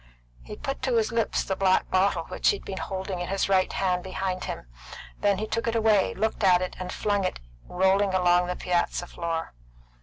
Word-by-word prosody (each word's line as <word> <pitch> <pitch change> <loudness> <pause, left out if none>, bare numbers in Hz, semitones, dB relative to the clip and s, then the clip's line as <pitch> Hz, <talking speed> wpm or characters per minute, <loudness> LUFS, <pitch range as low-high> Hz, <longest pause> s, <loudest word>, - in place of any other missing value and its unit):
He 210 - -9
put 275 +3 -5
to 255 -3 0
his 225 +1 +1
lips 230 -1 0
the 190 - -2
black 190 -1 +2
bottle 190 +2 +2
which - - 0
he 415 - +3
had - - -11
been 190 -1 -5
holding 190 -1 -4
in 175 - -3
his 195 0 0
right 190 -1 +2
hand 180 -2 0
behind 185 0 -3
him; - - -5 0.5
then 205 -1 +2
he 215 - -2
took 230 +2 -2
it 230 - 0
away, 220 -3 +3
looked 220 +1 -1
at 185 -1 +5
it, 185 - -5
and 180 0 -5
flung 205 -1 0
it 185 - -2 0.3
rolling 190 +2 +2
along 180 -1 +3
the 180 - -2
piazza 175 0 -1
floor. 165 - -4
190 Hz, 210 wpm, -26 LUFS, 180-210 Hz, 0.5 s, at